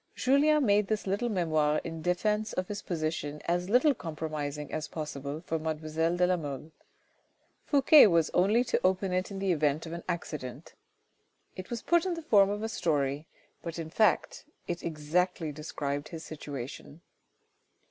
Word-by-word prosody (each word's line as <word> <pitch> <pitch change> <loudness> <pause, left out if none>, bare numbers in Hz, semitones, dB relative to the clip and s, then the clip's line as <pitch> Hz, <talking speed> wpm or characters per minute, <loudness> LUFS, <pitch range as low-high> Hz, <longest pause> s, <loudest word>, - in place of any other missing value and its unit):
Julien 290 +2 +3
made 205 -1 +3
this 215 0 -1
little 200 +5 -1
memoir 155 -6 +1
in 165 -1 -6
defence 210 +5 0
of 185 0 -2
his 205 0 -4
position 155 -3 -3
as 175 +2 0
little 255 +6 +5
compromising 150 - -5
as 155 - -3
possible 150 -1 -5
for 160 - -1
mademoiselle 160 +2 -1
de 180 - +4
la 180 0 +2
Mole. 145 -1 -6 1.0
Fouque 285 -3 +7
was 165 -3 +2
only 210 +7 +3
to - - 0
open 185 0 +1
it 185 +1 0
in 200 - -6
the 195 -1 0
event 150 -1 +1
of 165 - -7
an 170 - -5
accident. 150 -5 -5 0.8
It 185 -1 -8
was 235 -1 -4
put 345 -1 +3
in 355 - -1
the 330 - -7
form 200 -9 +5
of 205 +1 -3
a - - 0
story, 145 -6 -1 0.3
but 170 -1 -6
in 160 -1 -6
fact 215 +1 +1 0.2
it 175 0 -3
exactly 165 +1 -1
described 145 -1 -4
his 160 -2 -8
situation. 145 0 -8
170 Hz, 165 wpm, -29 LUFS, 155-200 Hz, 1.0 s, Fouque